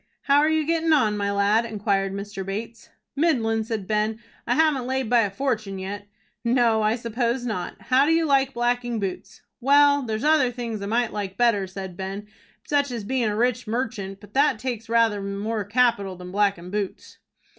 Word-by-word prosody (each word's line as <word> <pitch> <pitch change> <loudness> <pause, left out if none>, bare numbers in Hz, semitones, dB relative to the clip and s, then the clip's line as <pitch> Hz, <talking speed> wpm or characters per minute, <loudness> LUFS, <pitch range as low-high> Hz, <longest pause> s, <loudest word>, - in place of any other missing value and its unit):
"How 280 0 +4
are 305 +1 +3
you 315 -1 +1
getting 325 0 +2
on, 220 -8 +3
my 200 -1 -1
lad?" 200 +3 +2
inquired 200 -3 -1
Mr. 200 0 -5
Bates. 215 +4 -6 0.3
"Middlin'," 235 -8 +1
said 220 -3 -4
Ben. 215 +1 0 0.3
"I 245 - +2
haven't 295 -5 +2
laid 260 -3 -2
by 240 - +5
a 210 -3 +2
fortun' 215 -3 -2
yet." 200 +2 -6 0.4
"No, 235 -2 +3
I 215 +1 +2
suppose 235 +1 -2
not. 210 -7 -4
How 265 +2 +3
do - - +3
you 325 0 +3
like 275 -2 +2
blacking 240 -1 0
boots?" 195 -3 -6 0.2
"Well, 285 +2 +5
there's 220 -3 -3
other 300 -4 +4
things 235 -4 -5
I 200 - -4
might 235 +2 0
like 195 -2 -4
better," 230 -5 +2
said 190 -1 -7
Ben, 195 +2 -5 0.4
"such 285 -1 +1
as 235 -4 -4
bein' 240 +1 0
a 210 - -2
rich 245 +1 0
merchant; 220 -4 -3
but 205 0 -15
that 280 -4 +3
takes 230 -2 -5
rather 230 -3 +2
more 205 +2 -3
capital 205 -3 +1
than 180 0 -9
blackin' 195 -3 0
boots." 205 -2 -5
225 Hz, 190 wpm, -24 LUFS, 200-255 Hz, 0.4 s, by